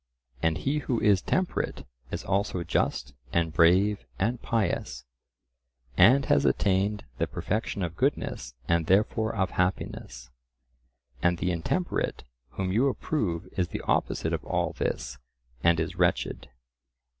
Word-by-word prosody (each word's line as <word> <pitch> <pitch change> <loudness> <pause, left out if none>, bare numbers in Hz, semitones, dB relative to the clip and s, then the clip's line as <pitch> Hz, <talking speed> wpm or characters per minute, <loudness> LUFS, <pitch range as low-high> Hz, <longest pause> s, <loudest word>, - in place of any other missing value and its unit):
And 80 0 +2
he 140 +9 0
who 125 -5 -1
is 100 -3 +4
temperate 185 -1 -1 0.2
is - - -4
also 100 -2 0
just 65 -4 -1 0.2
and 85 -2 +1
brave 95 +3 +4
and 115 +6 0
pious, 100 - -1 0.9
and 125 +9 +6
has 70 -1 +3
attained 100 +5 +1
the - - +1
perfection 105 -2 -2
of 85 -1 -3
goodness - - -1
and 85 -1 +1
therefore 110 +3 +2
of 95 -3 0
happiness, 65 -9 -2 0.9
and 90 0 +2
the 90 +2 0
intemperate 90 - -1 0.3
whom 95 -1 -2
you 120 +8 +3
approve 105 - -1
is 90 -2 +1
the - - -5
opposite - - 0
of - - -2
all - - -1
this 60 +2 -3 0.4
and 85 -1 +4
is 80 - -2
wretched. - - 0
95 Hz, 135 wpm, -27 LUFS, 85-110 Hz, 0.9 s, and